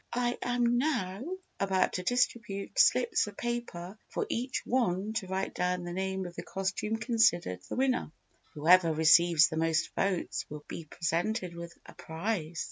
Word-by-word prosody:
"I 245 0 0
am 240 -1 +1
now 225 -9 -1 0.4
about 190 -1 +1
to 185 - -3
distribute 230 - -1
slips 470 - +4
of 205 - -9
paper 220 -5 -4
for - - -2
each 250 +3 -2
one 215 -4 0
to 225 -4 -3
write 190 +1 -2
down 180 0 -1
the 175 0 -5
name 190 0 -2
of 175 -1 -8
the - - -5
costume 195 +3 -2
considered 220 - +2
the - - -3
winner. 255 - 0 0.4
Whoever 165 +3 +5
receives 160 +1 +6
the 160 - -4
most 165 0 0
votes 195 -2 -1
will 150 0 -8
be 165 - -7
presented 170 +4 -2
with 170 0 -9
a - - -13
prize. 165 -1 -4
190 Hz, 160 wpm, -30 LUFS, 170-230 Hz, 0.4 s, receives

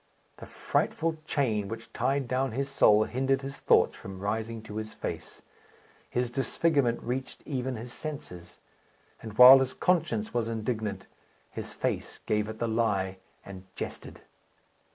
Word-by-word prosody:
The - - -10
frightful 165 -1 -1
chain 110 -8 0
which 115 +2 -8
tied 135 -1 0
down 130 0 0
his 135 +3 -1
soul 110 -6 +5
hindered 135 +3 0
his 135 0 -7
thoughts - - +4
from 95 -1 -9
rising 110 +3 -3
to 105 -1 -8
his 110 0 -5
face. - - -7 0.7
His 125 -1 -1
disfigurement 135 -1 +1
reached 130 +2 -4
even 130 -3 -2
his 120 +2 -8
senses; 90 - -8 0.6
and, 110 -2 -9
while 130 +2 +11
his 130 -1 -1
conscience 155 - 0
was 120 -2 0
indignant, 110 -3 -3 0.5
his - - -6
face - - -3
gave 105 0 0
it 110 - -6
the 115 - -1
lie, 100 -4 0 0.3
and 95 -1 -10
jested. - - -7
115 Hz, 145 wpm, -29 LUFS, 110-135 Hz, 0.7 s, while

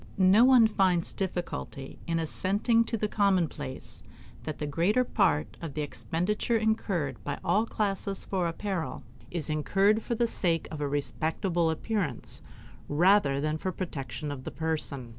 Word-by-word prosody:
No 195 +4 +6
one 255 -3 +7
finds 190 -5 +2
difficulty 175 -7 -4
in 165 0 0
assenting 200 +8 +1
to 230 - -2
the 210 - 0
commonplace 185 - -1 0.4
that 155 - -4
the 150 - -3
greater 175 - +2
part 195 -10 +1
of 165 -5 -6
the 150 - -1
expenditure 180 +10 -1
incurred 195 - -1
by 140 - -3
all 220 +3 +2
classes 200 -2 -2
for 185 -3 0
apparel 165 -6 -3 0.3
is 170 -3 -3
incurred 195 +8 +2
for 235 - -2
the 235 - +2
sake 170 -7 0
of 155 -2 -5
a 145 - 0
respectable 160 +4 0
appearance 160 - -3 0.5
rather 160 -2 +4
than 155 +2 -1
for 190 - -2
the 185 - -8
protection 145 -5 -4
of 135 -2 -6
the - - -4
person. 150 -6 -3
175 Hz, 155 wpm, -29 LUFS, 150-205 Hz, 0.5 s, one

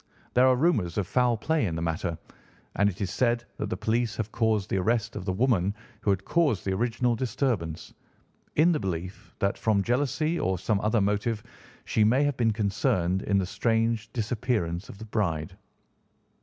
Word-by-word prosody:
There 125 +1 +5
are 130 - +5
rumours 125 - +1
of 100 - +1
foul 125 +3 +2
play 160 +6 0
in 85 - -3
the 80 - -3
matter, 85 0 -2 0.6
and 100 +1 +3
it 95 - -8
is 95 -2 -1
said 120 -1 +1
that - - -3
the - - -2
police 110 +2 0
have 110 -1 -3
caused 110 -3 0
the - - +2
arrest 115 +3 0
of 90 - -5
the 95 - 0
woman 100 -2 +1 0.3
who 105 - -1
had 95 -1 +1
caused 150 - +1
the 95 - 0
original 120 +3 +1
disturbance, 115 - -2 0.6
in 165 +4 +5
the 155 - +1
belief 90 - -5
that, 100 -2 0
from 105 -3 +2
jealousy 145 - 0
or 95 0 0
some 100 +3 0
other 105 +1 +2
motive, 105 +2 0 0.4
she 110 - +2
may 125 +7 +4
have 145 -2 +1
been 115 -2 +2
concerned 100 -3 0
in 100 -1 +1
the 95 - +1
strange 115 +2 0
disappearance 110 -6 -2
of - - -10
the 110 - -8
bride. 85 -8 -2
110 Hz, 185 wpm, -27 LUFS, 95-120 Hz, 0.6 s, There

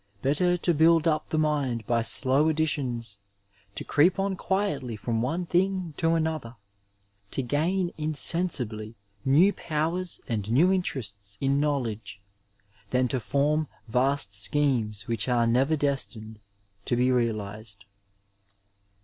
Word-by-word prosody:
Better 175 +6 +2
to 175 0 +1
build 165 +1 +4
up 155 -1 0
the 155 - -1
mind 140 -7 0
by 120 +1 +1
slow 135 +6 +3
additions, 130 -9 -2 0.6
to - - -5
creep 165 +5 +3
on 195 0 -1
quietly 175 - -2
from 115 +1 -2
one 165 +9 -2
thing 185 -1 0
to 165 0 +2
another, 155 -7 -2 0.7
to 135 - -2
gain 170 +8 0
insensibly 140 -8 0 0.3
new 165 +10 +4
powers 165 +3 -3
and 110 -2 -3
new 170 +10 +4
interests 100 - -4
in 135 +1 +1
knowledge, 115 -9 -2 0.7
than 125 0 +1
to 130 - -1
form 145 +5 0 0.2
vast 125 -2 +1
schemes 110 -1 0
which 115 +1 -1
are 120 -1 +2
never 130 +7 +2
destined 125 -7 -3 0.5
to - - 0
be 125 +1 +2
realiased. 110 -4 -3
140 Hz, 125 wpm, -26 LUFS, 115-160 Hz, 0.7 s, build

